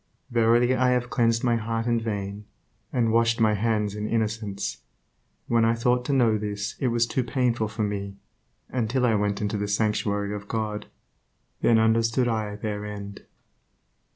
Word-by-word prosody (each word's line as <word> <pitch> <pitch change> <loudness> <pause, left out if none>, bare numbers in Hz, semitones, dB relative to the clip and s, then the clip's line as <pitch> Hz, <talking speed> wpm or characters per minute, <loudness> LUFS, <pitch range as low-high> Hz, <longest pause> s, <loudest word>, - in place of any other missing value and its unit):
Verily 120 +2 +4
I 130 0 +3
have 120 -1 -1
cleansed 115 -2 +2
my 120 -2 +3
heart 115 +1 -2
in 120 -1 +2
vain, 100 -2 -4 0.5
and 115 -3 +1
washed 115 +1 +3
my 110 -1 +4
hands 105 -1 0
in 105 0 -3
innocence... 105 - -2 0.7
When 115 -1 +2
I 115 +1 +3
thought 125 +1 +1
to - - -1
know 120 -5 +3
this 105 0 -3
it 130 - +1
was 120 -1 +2
too 130 +2 -1
painful 120 -3 0
for 110 +1 -3
me; 100 -1 -3 0.5
until 125 +1 0
I 115 - +3
went 105 -1 0
into 105 0 -1
the 105 - -1
sanctuary 100 -1 0
of 100 -1 -6
God, 105 -1 -3 0.7
then 115 - +4
understood 115 +2 +2
I 110 -3 -1
their 105 0 -4
end." 100 -1 -8
110 Hz, 165 wpm, -25 LUFS, 105-115 Hz, 0.7 s, Verily